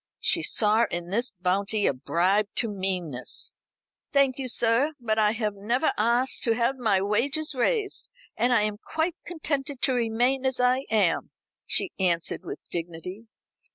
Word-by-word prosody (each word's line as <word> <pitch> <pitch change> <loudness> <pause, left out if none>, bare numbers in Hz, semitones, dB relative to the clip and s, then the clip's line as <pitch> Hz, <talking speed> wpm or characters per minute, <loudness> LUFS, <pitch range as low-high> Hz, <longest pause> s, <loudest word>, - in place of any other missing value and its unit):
She 340 - +2
saw 220 -4 +2
in 175 +1 -4
this 235 +5 +1
bounty 200 +3 0
a - - +3
bribe 180 +10 +1
to 230 - +1
meanness. 185 - -2 0.6
"Thank 275 -2 +3
you, 265 - -2
sir; 240 +5 +2
but 220 -2 0
I 210 0 +3
have 215 -3 -2
never 235 +9 0
asked 240 +4 +2
to 230 -2 +2
have 240 +3 0
my 205 -5 +2
wages 280 +10 0
raised, 400 - 0 0.3
and 245 - +1
I 230 -4 +4
am 210 -1 -2
quite 320 +2 -1
contented 290 -5 -3
to 260 - +4
remain 245 +3 +1
as 260 -1 0
I 250 +2 +2
am," 205 -6 +1 0.4
she 370 - +2
answered 170 -3 0
with 175 - -6
dignity. 175 +5 -6
225 Hz, 155 wpm, -26 LUFS, 195-260 Hz, 0.6 s, I